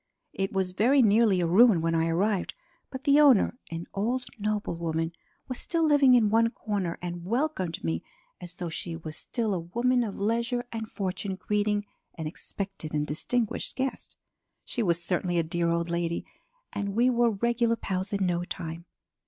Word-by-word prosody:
It 195 0 -2
was 190 -1 0
very 250 +8 +4
nearly 210 -3 +4
a - - +2
ruin 195 +3 +6
when 165 +1 0
I 165 0 +2
arrived 190 +4 0 0.3
but 260 0 -7
the 285 +1 +5
owner, 265 -4 +5
an 165 +1 -5
old 245 +6 -1
noblewoman, 170 -6 -1 0.4
was 255 - -4
still 335 -1 -1
living 290 -4 +6
in 220 -4 +4
one 230 +1 +4
corner 200 -7 -3
and 175 -1 -4
welcomed 215 - -1
me 80 0 -1 0.4
as 180 0 -7
though 175 -2 -4
she 165 +1 -4
was 160 -1 -7
still 225 +1 -2
a 185 - -1
woman 240 +9 +1
of 210 -4 -5
leisure 235 +4 0
and 225 -1 -5
fortune 190 0 -3
greeting 205 +1 0 0.3
an 160 - -5
expected 170 0 -5
and 150 0 +1
distinguished 220 +10 -2
guest. 265 0 -4 0.5
She 240 - -3
was 170 -4 +2
certainly 175 0 0
a 170 - +3
dear 170 +1 -1
old 170 0 0
lady 170 0 -1 0.5
and 200 -1 -3
we 245 +3 +4
were 240 -1 +3
regular 235 +2 +1
pals 190 -2 -3
in 200 -2 0
no 175 -1 0
time. 170 -2 -6
200 Hz, 175 wpm, -28 LUFS, 170-235 Hz, 0.5 s, ruin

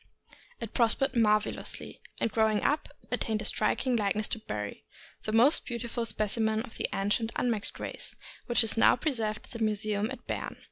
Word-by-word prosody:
It 230 -2 -6
prospered 255 +3 +3
marvelously, 215 -2 +1 0.2
and 230 - 0
growing 220 -1 +2
up, 295 +2 +1 0.2
attained 215 -1 -1
a - - -6
striking 255 +3 +1
likeness 215 0 0
to 225 - 0
Barry, 105 - -5 0.4
the 215 - -1
most 240 +8 +5
beautiful 235 -1 -3
speci 215 0 -1
men 220 0 +1
of 235 - -11
the - - 0
ancient 205 +3 0
unmixed 230 -4 -1
race, - - -6 0.3
which 240 0 +6
is 225 - 0
now - - +6
preserved 225 -6 -2
in 230 - -6
the - - 0
museum 215 0 0
at 265 - -8
Berne. - - -4
220 Hz, 175 wpm, -29 LUFS, 215-235 Hz, 0.4 s, which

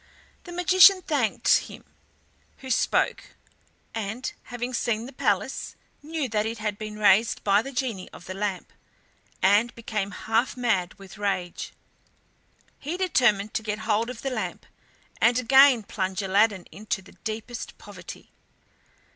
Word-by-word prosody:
The 350 - -9
magician 370 +2 +6
thanked 270 -8 +2
him - - -11 0.7
who 260 -1 -7
spoke, - - 0 0.6
and 225 +4 -4
having 245 +1 -5
seen 230 -1 -1
the 265 - -10
palace - - -1 0.3
knew 305 -1 -3
that 215 0 0
it 230 +1 -4
had 210 -1 -3
been 215 -1 -6
raised 215 +2 +3
by 200 0 +4
the 275 - -7
Genie 240 -8 -3
of - - -13
the 185 - -6
Lamp, 195 -1 -4 0.7
and 205 +5 +4
became 215 -3 -3
half 225 +6 -1
mad 205 -8 0
with 195 +1 -13
rage. 185 -4 -2 1.1
He 315 +6 -4
determined 240 - +2
to - - -1
get 215 -1 -3
hold 220 +2 +1
of 250 -2 -8
the 270 - -2
lamp, 210 -8 -4 0.6
and 235 +1 +4
again 265 -1 +6
plunge 190 -1 -3
Aladdin 200 0 +2
into 205 -1 -4
the - - -16
deepest 225 +2 -6
poverty. - - -11
220 Hz, 140 wpm, -26 LUFS, 200-250 Hz, 1.1 s, magician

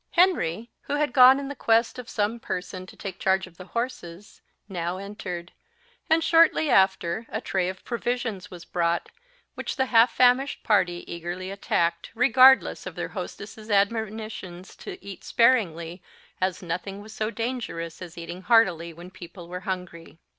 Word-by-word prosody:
Henry, 240 - +2
who 290 - -2
had 290 -3 0
gone 260 +1 +8
in 280 0 -5
quest 230 -2 +1
of 245 - -9
some 215 +2 -1
person 185 -2 -5
to - - -13
take 195 - -7
charge 190 0 +2
of 175 -3 -18
the 185 - -10
horses, 205 -5 -6 0.3
now 175 -2 -3
entered; 185 -3 -7 0.6
and 325 0 +4
shortly 330 -3 +4
after 190 0 +2
a 220 - -3
tray 185 -5 -1
of 185 0 -8
provisions 240 -5 -3
was 175 -1 -11
brought, 170 -1 -1 0.4
which - - -5
the 265 - +1
half 235 -1 +5
famished 255 +3 +3
party 180 -5 +2
eagerly 175 +2 -5
attacked, 170 -4 -1
regardless 255 +2 +5
of - - -7
their - - -4
hostess's 215 -1 -8
admonitions 205 -3 -2
to - - -8
eat 195 -3 -9
sparingly, 180 -8 +2 0.4
as 185 0 -1
nothing 195 +4 -5
was 215 +1 -11
so 215 0 -2
dangerous 225 -9 -4
as 175 -2 -9
eating 170 +2 -7
heartily 180 -6 +3
when 175 +3 -12
people 175 -1 -11
were 180 +1 -6
hungry. 175 -4 -6
195 Hz, 155 wpm, -25 LUFS, 175-235 Hz, 0.6 s, gone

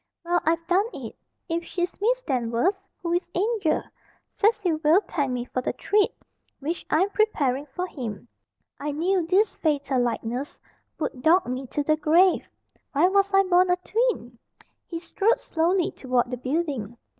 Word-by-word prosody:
"Well 350 0 +2
I've 330 +1 +1
done 375 +5 +2
it! - - -7 0.3
If 335 -1 -1
she's 355 +2 -4
Miss - - +1
Danvers 255 - 0 0.2
who 340 -1 -1
is 350 0 -1
'Angel?' 400 -3 +1 0.5
Cecil 405 -7 +1
will 320 +6 +5
thank 285 -10 -2
me 245 -1 -2
for 255 - -3
the - - -2
treat 415 -1 +2 0.5
which 320 +5 -3
I'm 375 +6 +2
preparing 295 - +1
for 360 +7 -4
him. 245 - -6 0.5
I 295 0 -3
knew 345 +3 +1
this 390 +5 +3
fatal 285 -4 +1
likeness 245 +3 -3 0.4
would 275 -5 -4
dog 340 +6 +4
me 255 +2 -4
to 290 - -2
the 310 +1 +2
grave. 335 +5 +4 0.5
Why 310 +6 +4
was 395 +1 +2
I 390 0 +5
born 365 -1 +4
a 360 - +4
twin?" 365 - -1 0.5
He 335 - -5
strolled 400 +7 +1
slowly 345 +2 +1
toward 250 -2 -1
the 250 - -2
building. 255 -5 -2
335 Hz, 160 wpm, -25 LUFS, 270-380 Hz, 0.5 s, will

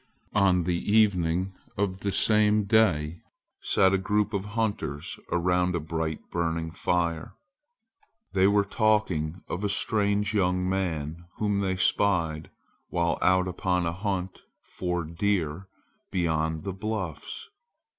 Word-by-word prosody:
On 90 -2 +3
the 85 0 -1
evening 95 -4 +2 0.2
of 95 -1 -1
the 100 - -2
same 105 +1 +3
day 90 -7 +2 0.4
sat 95 0 +3
a 95 - +3
group 105 +3 0
of 100 -1 -2
hunters 100 -10 -2
around 90 +1 +1
a - - 0
bright 80 0 -3
burning 80 -1 -1
fire. 85 -1 -1 1.0
They 95 0 +4
were 100 0 +4
talking 95 -7 0
of 90 - -4
a 105 - +1
strange 105 0 +1
young 90 -2 +1
man 85 -3 -2
whom 105 -2 0
they 95 -1 0
spied 85 -5 +1 0.4
while 85 -2 0
out 95 0 +3
upon 90 -1 0
a 85 - -1
hunt 95 -1 -3 0.2
for 90 -1 -3
deer 85 0 -1 0.4
beyond 80 -3 0
the 95 - -3
bluffs. 105 - -5
90 Hz, 125 wpm, -27 LUFS, 85-100 Hz, 1.0 s, They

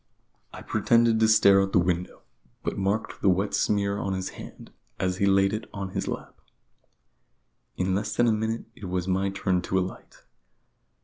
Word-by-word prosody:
I - - -10
pretended 115 -1 +2
to 110 - +4
stare 100 -3 +6
out - - +2
of 95 - -8
the - - +5
window, 90 0 -1 0.4
but - - -2
marked 100 +3 -2
the 100 - +4
wet 95 +3 +1
smear 100 -1 +1
on 95 - -2
his 95 0 -3
hand - - -11 0.3
as 90 0 -1
he 100 - +2
laid 95 0 +3
it 110 +1 -5
on 100 -1 -4
his - - -4
lap. - - -6 1.4
In 95 +1 0
less 105 +2 -2
than 120 - +3
a - - +4
minute 110 +1 -2
it 105 - -10
was 90 0 -2
my 95 +1 +1
turn 95 -2 0
to 95 - -1
alight. 95 0 -5
95 Hz, 185 wpm, -26 LUFS, 95-105 Hz, 1.4 s, stare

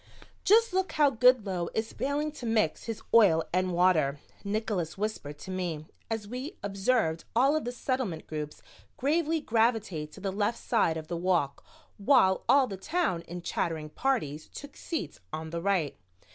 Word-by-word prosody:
"Just 450 +1 +5
look 375 0 0
how 295 -2 +4
Goodloe 220 -8 +3
is 220 0 -2
failing 290 +2 -1
to 280 -5 -7
mix 215 -8 +1
his 225 -2 -5
oil 185 -8 +6
and 185 0 +1
water," 170 -5 +3 0.3
Nickols 200 -6 -2
whispered 195 -8 -4
to 190 - -8
me, 175 -5 -3 0.2
as 220 -2 -3
we 255 - -6
observed 195 -4 +1
all 270 +5 +4
of 310 - -1
the 245 - -2
Settlement 245 - -2
groups 150 -1 -6 0.3
gravely 320 +3 +1
gravitate 220 - 0
to - - -11
the 195 -1 -2
left 205 +4 0
side 165 -9 +1
of 155 -1 -7
the 175 - -3
walk 170 -6 0 0.4
while 200 -5 +4
all 275 -1 +6
the 200 -6 -6
Town 295 - 0
in 175 0 -7
chattering 160 -4 -2
parties 155 - -1
took 285 -1 -10
seats 300 - -5
on 160 0 -5
the 170 0 -3
right. 180 - 0
200 Hz, 165 wpm, -29 LUFS, 165-255 Hz, 0.4 s, oil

